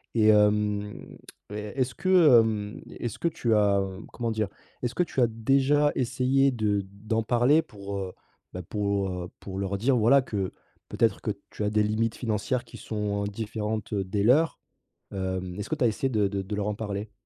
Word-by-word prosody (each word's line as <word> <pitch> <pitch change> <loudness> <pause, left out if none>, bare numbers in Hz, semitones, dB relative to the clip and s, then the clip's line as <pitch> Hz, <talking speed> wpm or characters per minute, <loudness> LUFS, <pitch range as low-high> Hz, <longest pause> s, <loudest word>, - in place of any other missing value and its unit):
et 110 -1 +5
hem, 105 -1 +1 0.3
et - - -6
e 105 0 -5
est-ce 130 -1 0
que, 175 -10 +6
hem, 105 -2 -1
e - - -11
est-ce 120 - -4
que 170 - +1
tu 120 -8 0
as, 100 -1 +4
hem, 95 +2 -6
comment 115 -2 -2
dire? 110 -1 0 0.4
Est-ce 125 - -2
que 180 - +3
tu 150 - -4
as 120 - +5
déjà 135 +6 +2
essayé 130 +2 +2
de 105 -5 0
d'en 110 +3 -2
parler 125 +7 +4
pour, 100 -4 -7
heu, 95 -1 -5 0.4
bah 90 - -5
pour, 100 +1 -1
heu, 90 -1 -5
pour 95 0 -6
leur 100 0 -2
dire 125 +5 +2
voilà 120 +5 +5
que 100 -6 -3 0.4
peut-être 115 - +1
que 105 - -1 0.2
tu - - -4
as - - +1
des 105 0 +2
limites 110 +2 0
financières 120 +2 -1
qui - - -12
sont 105 -2 -2
différentes, 110 0 -4
heu, 100 - 0
des 100 +2 -1
leurs? 145 +9 +3 0.5
Hem, 95 -1 -3
est-ce 105 - -5
que - - 0
tu - - 0
as - - +6
essayé 130 +5 -1
de 105 -4 +2
de 100 0 -3
de 100 +2 -5
leur 105 0 -1
en 105 - -1
parler? 105 -1 -4
105 Hz, 205 wpm, -27 LUFS, 100-120 Hz, 0.5 s, que